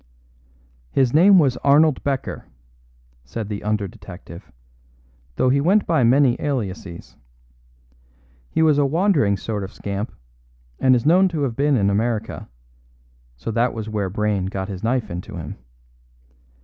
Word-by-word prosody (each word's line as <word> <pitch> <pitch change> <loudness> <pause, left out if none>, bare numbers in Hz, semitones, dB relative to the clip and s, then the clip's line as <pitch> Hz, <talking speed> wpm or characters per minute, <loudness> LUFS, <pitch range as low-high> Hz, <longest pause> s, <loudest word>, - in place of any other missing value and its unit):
"His 130 - +1
name 190 +6 +6
was 140 -7 +3
Arnold 145 +1 +3
Becker," 135 -2 -3 0.8
said 105 - -6
the 105 -1 -4
under 105 -1 -1
detective, 90 0 -12 0.8
"though 130 - +2
he 140 +2 +2
went 195 +7 +3
by 160 -6 +2
many 130 +1 +3
aliases. 100 -10 -5 1.3
He 160 - +1
was 150 -2 +4
a 145 - +3
wandering 155 - +2
sort 105 +1 -4
of 95 - -7
scamp, 100 +2 -5 0.7
and 130 -1 +4
is 120 - -1
known 180 +5 +5
to 160 -5 -2
have 125 -5 -2
been 140 0 +2
in 100 -2 +2
America; 110 +1 -2 0.9
so 85 - -5
that 115 +2 0
was 110 -1 -5
where 105 -3 -2
Brayne 100 -1 -1
got 95 0 -4
his 95 -2 -6
knife 120 -2 -1
into 90 +1 -7
him. - - -7
120 Hz, 145 wpm, -21 LUFS, 100-145 Hz, 1.3 s, name